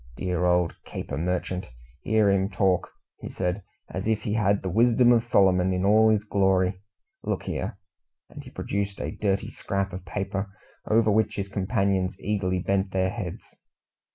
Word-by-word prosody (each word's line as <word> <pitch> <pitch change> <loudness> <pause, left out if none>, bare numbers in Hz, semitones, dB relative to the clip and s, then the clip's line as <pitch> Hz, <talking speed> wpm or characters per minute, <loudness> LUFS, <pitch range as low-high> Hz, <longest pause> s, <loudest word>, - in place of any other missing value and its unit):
"Dear 90 -1 -1
old 90 -1 +2
caper - - -6
merchant! 90 +2 -2 0.3
Hear 110 -2 +3
him 95 0 +1
talk!" 95 -2 +1 0.4
said 90 0 -2
he, - - -12 0.3
"as 95 +3 -3
if 110 -1 0
he 105 - -2
had 100 -2 +2
the - - -2
wisdom 120 +4 +4
of 120 -2 +5
Solomon 95 -5 +3
in 90 +1 0
all 110 +2 +5
his 105 -1 +2
glory? 95 -2 +1 0.4
Look - - -2
here!" - - -4 0.5
And - - -11
he - - -11
produced 100 -1 -3
a - - -3
dirty 100 -2 -1
scrap 100 -1 -3
of 90 0 -6
paper, 100 +2 -3 0.4
over 110 0 +3
which 110 +1 +1
his 100 -1 -3
companions 95 -1 0
eagerly 95 -3 -1
bent 95 +1 0
their 95 0 0
heads. 100 -6 -7
95 Hz, 165 wpm, -26 LUFS, 95-105 Hz, 0.5 s, of